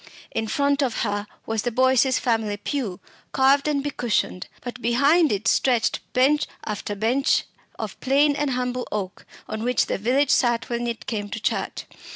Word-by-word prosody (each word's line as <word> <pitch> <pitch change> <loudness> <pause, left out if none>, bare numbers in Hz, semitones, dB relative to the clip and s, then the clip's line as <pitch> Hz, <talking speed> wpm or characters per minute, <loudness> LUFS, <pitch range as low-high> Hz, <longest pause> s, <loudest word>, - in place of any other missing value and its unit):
In 220 - -2
front 280 +4 +1
of 250 -6 0
her 205 -1 -2 0.2
was 225 -1 -1
the 245 - -1
Boyces' 260 +2 +3
family 220 -4 0
pew, 220 -5 -3 0.3
carved 275 +2 +4
and 285 -2 0
becushioned, 240 -9 -1
but 240 -1 -7
behind 280 +7 +4
it 205 +1 -1
stretched 245 -4 +2
bench 280 +4 +3 0.2
after 210 -1 -4
bench 235 +7 +2 0.3
of - - -6
plain 285 +2 +3
and 290 0 0
humble 250 -1 -2
oak, 195 -3 -5 0.2
on 220 - -4
which 245 -1 +2
the - - -2
village 260 +6 +2
sat 240 -2 +2
when 240 0 -2
it 235 -1 -4
came 205 -3 -3
to 220 - -5
church. - - -2
245 Hz, 170 wpm, -24 LUFS, 220-275 Hz, 0.3 s, carved